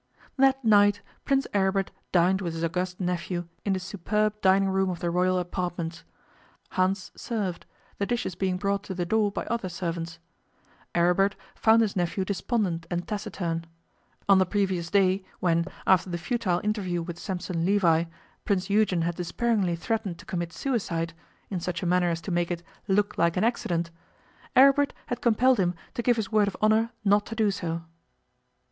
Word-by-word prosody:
That 270 -1 +3
night 205 -1 +5 0.2
Prince 275 0 +2
Aribert 195 -1 +1 0.2
dined 185 +2 +3
with 170 -3 -3
his 165 - -3
august 180 +2 -2
nephew 175 -1 -2 0.2
in 200 - +1
the 190 - -1
superb 205 +3 -1
dining 195 +1 +4
room 190 0 +1
of 175 -2 -4
the 175 - -1
Royal 185 +1 +2
apartments. 175 -2 -3 0.7
Hans 185 +1 0
served, 200 -7 -3 0.3
the 200 - 0
dishes 240 -6 -1
being 185 +1 -1
brought 200 +1 0
to 190 - -5
the 175 -1 -1
door 210 +2 +2
by - - -4
other 230 -5 -2
servants. 170 -1 -4 0.8
Aribert 180 +4 +3 0.2
found 225 +1 +4
his 210 - -2
nephew 180 +1 0
despondent 185 -4 -1
and 175 0 -3
taciturn. 190 -6 -3 0.6
On 195 -1 +6
the 185 - +4
previous 185 -4 0
day, 190 0 +3 0.2
when, 170 -2 +2 0.2
after 190 -1 +4
the 175 - -2
futile 185 -1 -1
interview 190 -5 -1
with 170 0 -7
Sampson 180 -3 -3
Levi, 170 -4 +3 0.4
Prince 195 -1 0
Eugen 200 -5 +3
had 170 +1 0
despairingly 185 +2 0
threatened 200 0 -2
to - - -14
commit 170 -2 -3
suicide, 165 -10 -2 0.4
in 185 - -1
such 175 +1 -3
a - - -1
manner 180 0 +3
as 165 0 -2
to 185 - -5
make 175 0 +1
it 175 -1 -3 0.2
'look 205 +1 +1
like 170 +1 +2
an 185 - +2
accident', 170 -8 0 0.6
Aribert 275 +2 +6
had 245 -1 -4
compelled 245 +1 +4
him 180 -1 +1 0.2
to - - -2
give 240 0 +3
his 215 -4 -3
word 210 -2 +4
of 200 - -4
honour 220 +2 +3 0.2
not 205 +1 +3
to 225 - -6
do 215 -2 +2
so. 165 -3 -3
190 Hz, 175 wpm, -27 LUFS, 175-210 Hz, 0.8 s, On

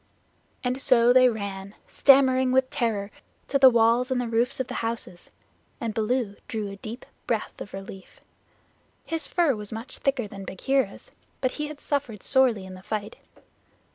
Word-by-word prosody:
And 250 +1 -1
so 245 -2 +5
they 255 0 +7
ran, 200 -3 -5
stammering 260 -2 +4
with 260 0 +2
terror, 220 -6 -1 0.4
to 275 - +2
the 265 -1 +9
walls 235 +1 +3
and 260 -1 0
the 245 - -2
roofs 235 +4 0
of 260 - 0
the - - -7
houses, 225 -6 -4 0.5
and 230 -2 -3
Baloo 220 -1 -1
drew 215 -3 -4
a 200 - -9
deep 225 +5 -8 0.2
breath 225 -3 -2
of - - -7
relief. 195 0 -10 0.9
His 325 -2 -2
fur 335 -7 +2
was 210 -1 -7
much 225 +4 -7
thicker 270 -5 0
than 195 -1 -9
Bagheera's, 265 +9 -1 0.3
but 255 - 0
he 300 0 -4
had 300 -1 -9
suffered 265 -10 -3
sorely 250 -7 +3
in 190 - -9
the 185 - -11
fight. 210 +1 -4
235 Hz, 170 wpm, -26 LUFS, 210-260 Hz, 0.9 s, the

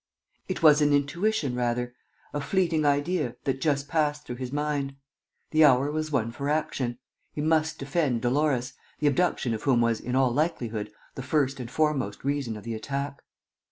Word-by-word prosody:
It 185 -3 -4
was 150 -1 +7
an 145 -1 +4
intuition, 145 - +1
rather, 125 0 -1 0.4
a 145 - -2
fleeting 165 -2 +1
idea, 145 -2 +1
that 135 -1 -1
just 140 -3 +1
passed 150 -2 0
through 120 - -6
his 130 -1 -5
mind. 145 -1 -1 0.6
The 155 0 +5
hour 140 0 +5
was 155 0 -2
one 115 -5 0
for 140 +4 -4
action. 135 -5 -1 0.4
He - - -6
must 160 0 +1
defend 140 -4 0
Dolores, 130 -1 +1 0.2
the 150 - -2
abduction 145 -4 +2
of 110 - -4
whom 130 -4 +3
was, 115 -1 +2
in 125 +1 -3
all 130 -2 +3
likelihood, 120 -8 -1 0.2
the - - -6
first 135 0 0
and 120 -2 -5
foremost 135 -8 0
reason 140 -5 -1
of 105 - -10
the 115 - -4
attack. 140 +5 -4
140 Hz, 175 wpm, -27 LUFS, 125-150 Hz, 0.6 s, was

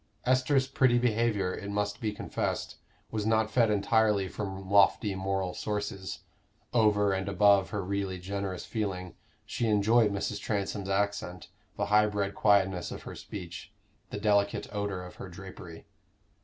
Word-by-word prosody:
Esther's 130 +2 +3
pretty 130 -2 +3
behavior, 110 -5 +1
it 100 - -6
must 105 0 -2
be 110 -2 0
confessed, 105 - -3 0.3
was 110 -2 -2
not 110 0 +2
fed 115 -3 +3
entirely 105 -1 +2
from 95 0 -6
lofty 100 +1 +4
moral 95 -1 -2
sources: 100 -2 -4 0.5
over 105 -4 +3
and 95 0 -2
above 100 0 +4
her 105 -3 -3
really 100 0 -2
generous 95 0 -4
feeling, 95 -5 -3 0.3
she 115 - -2
enjoyed 110 +1 +4
Mrs. 100 -1 -2
Transome's 100 -1 -2
accent, 100 -3 -1 0.3
the - - 0
high 105 0 +6
bred 100 -1 -2
quietness 95 -4 +2
of - - -7
her - - -7
speech, 90 -4 -8 0.4
the - - -5
delicate 100 -1 +2
odor 100 -3 -3
of 90 - -12
her 95 - -8
drapery. 90 -2 -10
100 Hz, 145 wpm, -29 LUFS, 95-105 Hz, 0.5 s, high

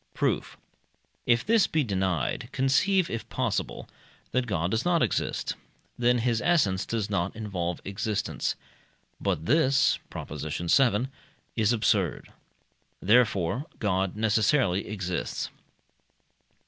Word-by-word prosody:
Proof. - - -1 0.7
If 120 0 +3
this 225 -1 +4
be 155 -2 +1
denied, 95 - -1
conceive, 175 +8 +2
if 115 - -5
possible, - - -2 0.4
that 125 -1 0
God 85 -3 -1
does 110 +2 0
not 175 -2 +3
exist: - - -1 0.4
then 125 0 +3
his 115 -1 +1
essence 105 - +2
does 110 -3 -1
not 100 -2 -1
involve 90 -6 -3
existence. 105 +2 -2 0.6
But 80 - -1
this 140 - +3
(Prop. - - -7
vii.) 105 - +1 0.5
is 110 -1 +2
absurd. 105 -6 0 0.7
Therefore 110 - +2
God 95 -3 0
necessarily 110 -1 +2
exists. 95 -4 -3
110 Hz, 110 wpm, -27 LUFS, 95-125 Hz, 0.7 s, this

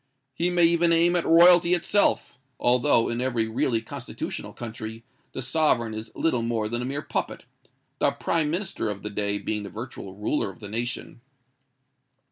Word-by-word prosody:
He 170 +7 0
may 175 -1 +2
even 170 0 +4
aim 170 +1 +4
at 175 - +2
royalty 175 +1 +6
itself—although, 130 - +1
in 120 +1 -2
every 120 -3 0
really 115 +1 0
constitutional - - -6
country, 115 -1 -7 0.3
the 130 - -5
sovereign 125 -5 +1
is 110 +1 -6
little 125 -8 0
more 115 -2 -1
than 120 +2 -2
a - - -3
mere 140 +3 -3
puppet, - - -4 0.5
the - - +4
Prime 160 -3 -1
Minister 175 - -2
of 100 -1 -6
the 105 - -4
day 100 0 -1
being 105 +1 -3
the 100 - -7
virtual 105 -2 -8
ruler 105 +3 -1
of 95 - -13
the 105 - -8
nation. 120 +2 -4
120 Hz, 165 wpm, -25 LUFS, 110-165 Hz, 0.5 s, royalty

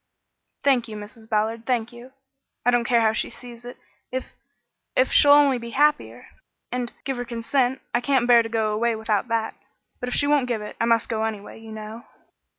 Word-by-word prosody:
"Thank 260 -4 +3
you, 215 - -8
Mrs. 220 +2 -11
Ballard, 225 +1 -1
thank 240 -2 0
you. 240 +2 -12 0.5
I 245 - +5
don't 240 -1 +2
care 235 -1 +3
how 220 -1 +3
she - - -1
sees 240 -1 -12
it, 245 - -9 0.3
if 260 0 -5 0.6
if - - +3
she'll 290 - +6
only 285 -3 +6
be 235 0 -7
happier 295 +1 +1 0.5
and 245 -1 -3
give 270 -2 -3
her 245 - -2
consent. 245 +2 -1
I 240 - +2
can't 265 -2 +2
bear 240 -1 +7
to 225 - -5
go 220 -2 0
away 230 +2 +1
without 220 +1 -1
that; 230 -1 -1 0.5
but 250 - -3
if - - -2
she 285 - +2
won't 285 -3 +2
give 230 -4 -2
it, 210 - -8
I - - +3
must 230 -1 +2
go 220 -2 -1
anyway, 215 -1 -5
you 225 0 -11
know." 215 +2 -8
235 Hz, 205 wpm, -24 LUFS, 225-250 Hz, 0.6 s, bear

